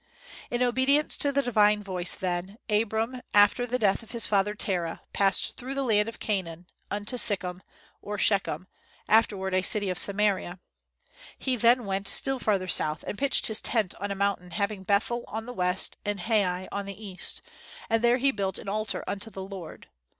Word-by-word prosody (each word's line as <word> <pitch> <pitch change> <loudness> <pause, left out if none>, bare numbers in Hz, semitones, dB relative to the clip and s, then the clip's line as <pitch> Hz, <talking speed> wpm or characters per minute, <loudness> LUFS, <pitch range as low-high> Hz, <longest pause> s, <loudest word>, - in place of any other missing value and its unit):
In 245 +1 0
obedience 260 +4 +2
to 285 - +2
the 280 0 +1
divine 210 -3 +3
voice 180 -2 -3
then, 185 +1 -3
Abram, 225 +4 0
after 205 +4 +5
the 250 +1 -1
death 205 -3 +1
of 225 - -16
his 230 -4 +5
father 205 +1 +1
Terah, 175 -5 -1
passed 195 -1 +2
through 265 +2 -5
the 275 - -1
land 215 -3 +2
of 230 - -10
Canaan 180 -5 -3 0.2
unto 210 +5 -3
Sichem, 185 -4 0 0.4
or 210 0 -5
Shechem, 195 -4 0 0.4
afterward 200 -4 +2
a 185 - +3
city 200 0 +3
of 180 - -1
Samaria. 200 -3 +1 0.8
He 260 -1 0
then 240 +1 +3
went 195 0 -2
still 270 -1 +4
farther 195 -5 0
south, 155 -3 0
and - - -4
pitched 275 +5 +1
his 220 -1 +3
tent 220 -6 0
on 200 +2 -3
a 200 - -2
mountain 195 -2 -1
having 200 +3 -2
Bethel 210 +5 0
on 220 +1 -5
the 245 - -7
west 180 -3 0
and 205 -2 -3
Hai 185 -3 0
on 200 0 -4
the 200 0 -8
east, 195 -4 -3 0.4
and 225 +1 +1
there 240 +1 +4
he 275 +2 +2
built 195 -4 -2
an - - -9
altar 215 +2 -2
unto 205 +3 -3
the 195 -3 -7
Lord. 190 -4 -9
205 Hz, 185 wpm, -27 LUFS, 190-230 Hz, 0.8 s, after